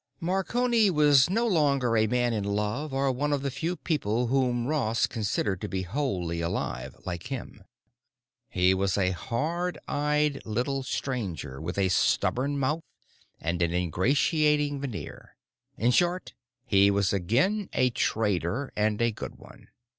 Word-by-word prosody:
Marconi 215 +5 +2
was 150 -4 +5
no 225 +5 +1
longer 140 - +2
a 110 0 +3
man 120 +1 +1
in 105 -2 -1
love 105 +9 -2
or 135 0 +1
one 145 +4 -1
of 140 -1 0
the 140 - -1
few 165 +7 -2
people 125 - -1
whom 125 -3 +1
Ross 125 -6 +1
considered 105 -4 -2
to 105 - -3
be 95 -2 -3
wholly 90 - -2
alive—like 85 - -4
him. 125 -6 -7 0.9
He 90 0 +3
was 95 0 0
a 95 -2 +2
hard 155 - -2
eyed 150 0 0
little 125 +5 -1
stranger 100 - -4
with 90 +4 -4
a 95 -1 +2
stubborn 135 +9 +1
mouth 145 +4 0 0.6
and 85 +2 -2
an 85 0 +1
ingratiating 145 - +1
veneer. 110 - -7 0.4
In 120 +3 +2
short 175 +7 +1 0.3
he 100 -4 +4
was 100 -1 +1
again 135 - +1
a 125 -1 +2
trader, 105 - -1
and 105 0 +1
a 115 - +2
good - - -7
one. - - -16
125 Hz, 145 wpm, -27 LUFS, 100-145 Hz, 0.9 s, was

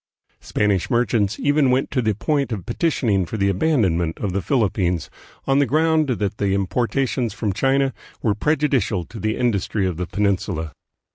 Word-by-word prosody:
Spanish 100 -4 0
merchants 115 -4 +1
even 145 -1 +3
went 130 +2 +1
to 130 - +1
the 110 -3 0
point 140 +4 0
of 100 -7 -4
petitioning 115 - +1
for 100 +6 -5
the 100 -1 +2
abandonment 95 - +1
of 100 -4 -3
the 100 - 0
Philip 115 -6 +1
pines, 90 -4 -1 0.3
on 135 +1 +3
the 140 - +3
ground 155 +2 +2
that 105 -5 -1
the 100 -1 +1
importations 120 +4 -1
from 105 -4 -1
China 135 +4 +1 0.3
were 110 - +2
prejudicial 135 - 0
to 110 - -10
the 110 +2 -1
industry 105 -4 0
of 90 -3 -2
the 90 0 -3
Peninsula. 95 -6 -1
110 Hz, 170 wpm, -21 LUFS, 95-135 Hz, 0.3 s, even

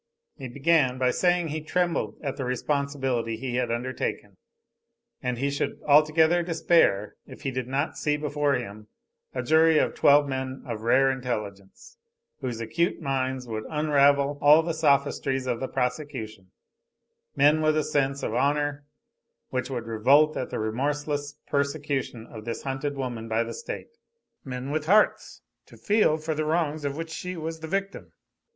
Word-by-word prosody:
He 135 -4 -7
began 140 0 +2
by 130 -1 +2
saying 175 -1 +2
that 155 - -4
he 155 +1 -3
trembled 165 - -1
at 140 -2 -3
the 135 - -4
responsibility 130 -2 -1
he 125 0 -3
had 125 -2 0
undertaken; 120 +2 -3 0.8
and 125 -1 -2
he 140 +3 -1
should 140 - -2
altogether 155 +3 +5
despair, 165 - +2
if - - -12
he 135 - -1
did 130 -1 -4
not 140 +4 -2
see 150 -1 +1
before 145 -1 0
him 110 -3 -6 0.5
a - - -2
jury 160 0 +4
of - - +2
twelve 145 0 +5
men 130 -1 -4
of 110 - -5
rare 135 +4 +4
intelligence, 115 - -6 0.4
whose 125 -5 -4
acute 170 - -1
minds 130 -3 -2
would 110 -1 -4
unravel 145 -2 +3
all 150 +3 +7
the 165 0 -2
sophistries 140 -3 +1
of 120 -2 -1
the 130 - -3
prosecution, 125 -7 -4 0.9
men 150 +2 +4
with 155 0 +2
a 155 - +2
sense 140 -2 0
of - - -2
honor, 145 +3 0 0.7
which 130 0 -2
would 120 -3 -4
revolt 140 +8 +4
at 130 - -3
the - - -4
remorseless 145 +5 -2
persecution 140 -4 -2
of 110 -2 -10
this 115 +1 -5
hunted 140 +2 -3
woman 120 -4 -4
by 115 +1 +1
the 115 0 -6
state, 460 - -8 0.4
men 130 +1 -5
with 155 0 -2
hearts 210 +4 +2 0.2
to - - -16
feel 205 -7 +2
for 160 0 -3
the 155 0 -2
wrongs 155 -1 0
of 140 +1 -2
which 165 0 -5
she 180 +2 -5
was 160 0 -5
the 160 - -7
victim. 195 +3 -3
140 Hz, 165 wpm, -26 LUFS, 125-155 Hz, 0.9 s, all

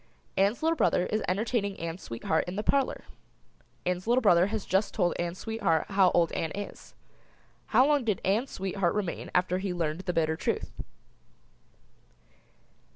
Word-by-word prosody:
Ann's 200 +8 +1
little 325 +1 +3
brother 180 - +2
is 215 - -1
entertaining 200 +1 -1
Ann's 165 +2 -5
sweetheart 115 +7 -1
in 180 - -4
the 210 - -2
parlor. 275 +2 +1 0.8
Ann's 180 +2 -2
little 245 +2 +3
brother 180 -3 +5
has 215 -1 -3
just 190 +3 0
told 175 -5 +2
Ann's 175 +1 -2
sweetheart 205 -8 -1
how 195 -2 +5
old 170 -1 +3
Ann 160 - -2
is. 205 0 -8 0.7
How 250 +4 +5
long 290 -2 +3
did 215 -5 0
Ann's 220 +8 +1
sweetheart 190 -1 -1
remain 195 -5 -3
after 180 0 +2
he 190 -2 -3
learned 160 -1 -1
the 185 -1 -3
bitter 160 -1 +1
truth? - - -2
190 Hz, 160 wpm, -28 LUFS, 175-220 Hz, 0.8 s, brother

